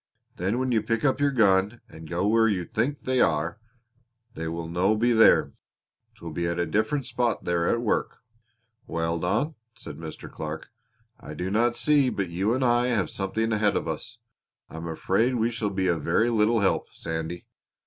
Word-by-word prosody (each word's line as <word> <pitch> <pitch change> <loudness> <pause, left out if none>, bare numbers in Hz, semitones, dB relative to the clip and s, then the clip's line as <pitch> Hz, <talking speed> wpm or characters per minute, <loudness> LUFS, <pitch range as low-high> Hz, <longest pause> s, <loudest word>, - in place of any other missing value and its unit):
Then 95 +6 -1
when 130 0 0
you 115 -2 +2
pick 115 +5 -1
up 135 -1 +2
your 145 - +4
gun 105 -3 +3
and 80 0 -12
go 85 +2 -1
where 115 +2 +4
you 95 -5 0
think 130 - -2
they 130 -1 +1
are, 85 +4 +1 0.7
they 80 -6 -5
will 85 0 -4
no 90 +5 +1
be 120 +3 +2
there; 110 -1 +5 0.6
'twill 85 -6 -8
be 85 +2 -2
at 85 0 -2
a 85 - +1
different 110 - 0
spot 120 -3 -1
they 90 - 0
are 85 0 +1
at 120 - +1
work." 115 - -1 0.7
"Well, 85 0 -1
Don," 140 - 0 0.2
said - - -9
Mr. 80 -1 -8
Clark, 80 0 -7 0.5
"I 75 - -9
do 90 +2 -3
not 120 +3 +2
see 145 -3 +3
but 100 -6 -3
you 95 +7 0
and 130 0 0
I 120 0 +3
have 115 -6 0
something 110 +4 -2
ahead 105 -1 +2
of - - -1
us. 80 +9 -5 0.5
I - - -8
am 80 +1 -6
afraid 100 +9 +1
we 115 0 +1
shall 115 -3 -2
be 95 -1 -1
of 85 -3 +1
very 110 +10 +2
little 110 0 +3
help, 95 - 0
Sandy. 80 +1 -5
100 Hz, 195 wpm, -26 LUFS, 85-120 Hz, 0.7 s, there